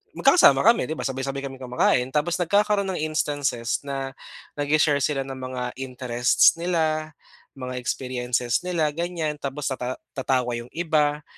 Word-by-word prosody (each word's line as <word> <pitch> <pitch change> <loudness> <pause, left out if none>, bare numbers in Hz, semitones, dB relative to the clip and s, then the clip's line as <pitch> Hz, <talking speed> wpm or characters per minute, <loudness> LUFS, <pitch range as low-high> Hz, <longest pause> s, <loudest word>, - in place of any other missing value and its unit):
magkakasama 275 - +6
kami 230 +2 +5
'di 160 - -1
ba, - - -3
sabay, 130 0 -4
sabay 135 0 -3
kaming 135 -1 -7
kumakain 125 0 +2
tapos 155 +4 0
nagkakaroon 200 +2 +2
ng 180 - -3
instances 145 -6 -1
na 135 -1 -4 0.5
nag-she-share 145 0 +3
sila 135 -2 0
ng 135 - -6
mga 130 -1 -4 0.2
interests 125 +1 +3
nila 160 -3 0 0.4
mga 130 -1 -6
experiences 125 -1 -1
nila 160 -4 +1
ganyan 170 -3 -2
tapos 140 +1 -4
tata 130 0 -3 0.2
tatawa 130 -2 0
yung 120 - -9
iba, 150 -3 +1
140 Hz, 150 wpm, -24 LUFS, 130-155 Hz, 0.5 s, magkakasama